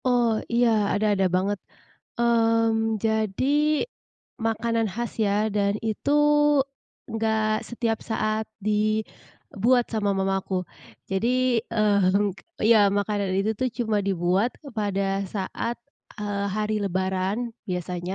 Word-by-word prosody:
Oh, 240 -3 +2
iya, 240 +1 +4 0.3
ada, 215 - +1
ada 195 -1 +2
banget. 195 +2 0 0.6
Mmm, 225 -2 +2
jadi 220 0 0 1.0
makanan 230 0 0
khas 235 +3 -4
ya, 200 - +1 0.2
dan 200 -1 +2
itu, 220 +5 -2 1.0
enggak 220 0 0
setiap 230 -2 -1
saat 215 0 0 0.2
dibuat 215 +2 0
sama 210 -2 0
mama 195 0 +1
aku. 190 - -4 0.6
Jadi, 195 +5 +1 0.4
mhm, 205 -2 +3 0.4
iya 230 0 +7 0.2
makanan 205 -1 -1
itu 200 +3 +1
tuh 255 - +2
cuma 220 -3 +1
dibuat 185 +5 +1 0.3
pada 195 -1 0
saat, 210 +4 -3 0.4
eee, 205 -1 -2
hari 215 0 0
lebaran, 190 +2 -1 0.3
biasanya. 180 0 -3
215 Hz, 110 wpm, -25 LUFS, 195-225 Hz, 1.0 s, iya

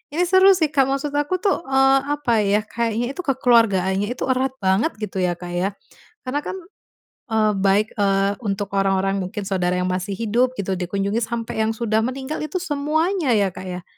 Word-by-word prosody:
ini 355 - +2
seru 375 +2 +6
sih 315 -4 0
Kak, 270 -3 +3
maksud 275 +2 -2
aku 290 +5 0
tuh, 400 - +2
eee, 270 0 +4 0.2
apa 240 -6 +1
ya, 205 +1 +2
kayaknya 235 +2 -2
itu 320 - -13
kekeluargaannya 225 - +2
itu - - -5
erat 260 +1 0
banget 190 +12 +2
gitu 195 -2 -4
ya, 180 -1 +1
Kak, 175 0 -8
ya. 175 +2 0 0.6
Karena 265 +3 -2
kan, - - -4 0.8
eee, 215 -1 +3
baik, 200 +2 +3
eee, 195 0 +2
untuk 200 0 -2
orang-orang 195 0 +1
mungkin 185 +3 -5
saudara 180 -2 0
yang 185 0 -1
masih 185 +2 -2
hidup 240 +3 +1
gitu 190 -2 -2
dikunjungi, 195 +4 -1
sampai 230 -1 -4
yang 220 - 0
sudah 220 -1 +1
meninggal, 265 +3 -4
itu 305 +4 -5
semuanya 310 - 0
ya, 200 -2 +2
Kak, 185 +1 -9
ya? 180 -1 -6
220 Hz, 185 wpm, -21 LUFS, 195-270 Hz, 0.8 s, seru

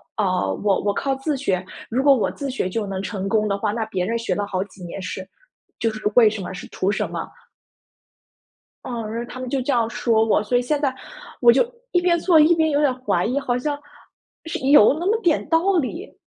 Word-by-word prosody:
啊 210 - 0 0.2
呃， 95 0 -1
我 200 -2 +2
我 205 0 +1
靠 270 +5 -1
自 275 +2 -2
学。 190 -9 -1 0.2
如 255 +4 0
果 280 - +7
我 235 - 0
自 280 -2 -5
学 255 -8 -2
就 210 +2 -2
能 195 -1 -4
成 195 -1 -4
功 215 0 +2
的 200 -1 0
话， 205 0 -1
那 225 0 -2
别 185 -4 -2
人 230 +3 -1
学 190 -6 -1
了 205 - -1
好 185 -2 -2
几 190 -2 -15
年 175 +3 -7
是 185 0 -6 0.5
就 230 - +1
是 215 - -8
为 230 -3 +7
什 210 -2 -5
么？ 185 - -6
是 180 - -8
图 195 +2 -1
什 - - -2
么？ - - -5 1.6
嗯， 230 -4 -5
然 235 - -3
后 240 - -11
他 255 - -8
们 255 -1 -5
就 270 -1 -1
这 275 +3 0
样 230 -2 +1
说 225 -1 +1
我， 210 -1 +2
所 245 +3 +1
以 - - +2
现 290 +4 -1
在 280 -3 0 0.5
我 240 - +8
就 250 - +4 0.3
一 355 - +3
边 350 -1 +3
做 330 -2 +4
一 315 +3 +6
边 320 -1 +2
有 285 - +1
点 290 -3 +3
怀 180 -8 0
疑， 255 +4 0
好 245 -3 -1
像， 290 +3 -2 0.7
是 340 +1 -4
有 270 -5 +7
那 350 - -3
么 440 +3 +2
点 335 -6 +1
道 345 +4 +3
理。 330 - -4
235 Hz, 260 characters per minute, -22 LUFS, 205-285 Hz, 1.6 s, 我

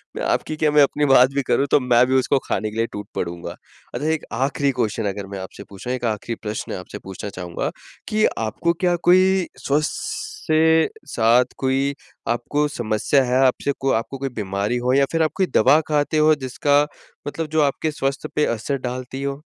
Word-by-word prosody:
मैं - - -4
आपकी 155 - -1
क्या 155 -1 +1
मैं 150 0 +5
अपनी 145 +1 +1
बात 130 -2 +6
भी 140 - +1
करूँ, 140 - +2
तो - - +6
मैं 125 -1 +4
भी 130 - +1
उसको 130 +1 +3
खाने 105 +2 -1
के 110 - -8
लिए 115 - +2
टूट 105 -1 -7
पड़ूँगा। 85 0 -4 0.4
अच्छा 150 - -2
एक 160 -1 -1
आखिरी 140 +1 +1
क्वेश्चन 110 -3 -1
अगर 100 0 -6
मैं 100 0 -6
आपसे 95 +1 -9
पूछूँ 100 +5 -6
एक 125 -1 -3
आखिरी 110 +1 -2
प्रश्न 105 0 -4
आपसे 90 - -9
पूछना 95 +2 -7
चाहूँगा, 90 -3 -4 0.4
कि 215 0 +2
आपको 115 +10 0
क्या 175 +1 +1
कोई 185 0 +4 0.2
स्वस्थ 150 +2 +1 0.5
से 160 +1 +4 0.2
साथ 120 +2 +4
कोई 135 +1 0 0.3
आपको 145 +5 0
समस्या 120 +1 +1
है। 125 0 +1
आपसे 130 +2 +1
को 135 0 +1
आपको 115 +4 -1
कोई 135 0 -3
बीमारी 100 +3 -1
हो 125 +1 0
या 140 +1 +4
फिर 165 - +1
आप 155 - +1
कोई 190 - +1
दवा 150 - +6
खाते 150 0 +1
हो 155 0 +5
जिसका 145 +1 +1 0.4
मतलब 160 +2 -3
जो 155 - +4
आपके 145 +2 0
स्वास्थ्य 140 +1 -3
पे 150 - +3
असर 115 +5 -2
डालती 130 +1 -5
हो? 140 +1 -3
135 Hz, 195 wpm, -22 LUFS, 115-150 Hz, 0.5 s, बात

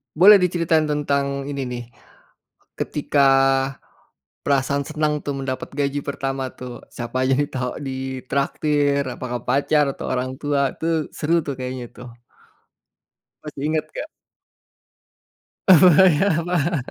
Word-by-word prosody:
Boleh 200 +5 +8
diceritain 170 -4 +1
tentang 140 -2 -1
ini 140 -2 -3
nih, 125 -1 -5 1.0
ketika, 145 -1 0 1.2
perasaan 140 0 +1
senang 150 -1 -1
tuh 145 - -2
mendapat 130 -1 -4
gaji 140 0 -1
pertama 135 -1 -3
tuh 125 -1 -9
siapa 120 +2 -3
aja 130 - +1
yang 145 - +1
tau 125 -1 -2
ditraktir? 140 +2 -1
Apakah 125 -1 -4
pacar 145 +3 +2
atau - - -7
orang 130 0 -2
tua? 140 -2 0
Itu 160 -1 -1
seru 165 +3 +1
tuh 140 - -3
kayaknya 125 -1 -5
tuh. 125 0 -10 1.3
Masih 150 -2 -8
inget 155 0 0
nggak? 310 - -6 1.6
Foya 185 +1 +6 0.2
fa 175 -1 0
140 Hz, 115 wpm, -22 LUFS, 130-155 Hz, 1.6 s, Boleh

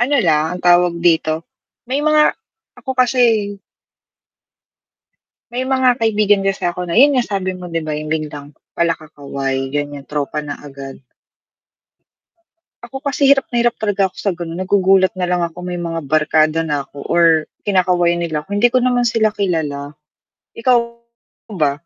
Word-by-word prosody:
ano 275 +4 +2
lang, 160 +2 +1
ang - - -9
tawag 175 0 +4
dito, 160 -2 +1 0.4
may 260 +3 -2
mga 305 0 +4 0.5
ako 265 -2 -5
kasi 235 -5 +2 1.9
may 255 +2 -3
mga 260 -2 +2
kaibigan 210 -3 +2
kasi 195 - -1
ako, 175 +1 -2
na 170 - -3
yun 280 +5 +6
nga, 245 - 0
sabi 195 -2 -2
mo 180 - -8
'di 165 -1 -3
ba, 155 - -5
yung 155 - -6
biglang, 150 -2 -5 0.2
pala 170 -1 0
kakaway 140 -3 -4
ganyan 145 -1 -4
tropa 150 0 -3
na 145 - -4
agad. 135 -1 -10 1.8
Ako 270 +4 -9
kasi 280 -1 +1
hirap 275 -1 +5
na 240 - +1
hirap 240 0 +1
talaga 200 -2 0
ako - - -28
sa 200 - -1
ganon, 170 -1 -6
nagugulat 190 0 +3
nalang 180 -1 -1
ako 170 +1 -6
may 180 0 -5
mga 170 -1 -3
barkada 155 +1 +2
na 145 -3 -3
ako 140 - -10
or 170 0 +4 0.4
kinakawayan 180 -3 +2
nila 155 -3 -2
ako, 200 +6 -5
hindi 240 +3 +3
ko 255 - +4
naman 245 -1 +1
sila 225 -2 +2
kilala, 150 -7 -2 0.6
ikaw 245 +2 +3 0.8
ba? 150 -7 +1
180 Hz, 155 wpm, -18 LUFS, 155-225 Hz, 1.9 s, yun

